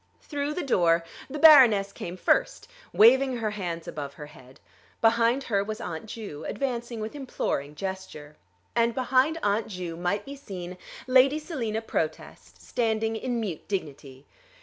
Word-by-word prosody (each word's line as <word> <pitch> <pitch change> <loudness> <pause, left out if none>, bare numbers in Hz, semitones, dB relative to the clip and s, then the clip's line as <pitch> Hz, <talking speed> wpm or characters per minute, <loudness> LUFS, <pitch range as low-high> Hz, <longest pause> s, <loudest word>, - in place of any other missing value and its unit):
Through 290 0 -3
the 360 - -2
door 170 - +3 0.3
the 290 - -5
Baroness 250 -11 +7
came 175 +1 -7
first, 435 - +1 0.2
waving 260 +3 +5
her 220 -2 -2
hands 175 -5 -5
above 140 -2 -6
her 150 - -8
head. 130 -3 -16 0.4
Behind 230 +3 +3
her 200 -5 0
was 215 +1 -5
Aunt 160 +5 -6
Ju, 205 -10 -7
advancing 240 -3 -3
with 215 - -5
imploring 150 - -3
gesture. 190 -5 -7 0.4
And 235 0 +2
behind 260 +5 +2
Aunt 205 +2 +1
Ju 180 -4 -6
might 180 +4 -2
be 280 - -8
seen 185 -9 -8 0.3
Lady 260 +3 +5
Selina 240 -9 -3
Protest 160 -7 -5
standing 225 -2 -1
in 240 +1 -2
mute 195 -8 -5
dignity. 145 -8 -6
220 Hz, 150 wpm, -27 LUFS, 175-255 Hz, 0.4 s, Baroness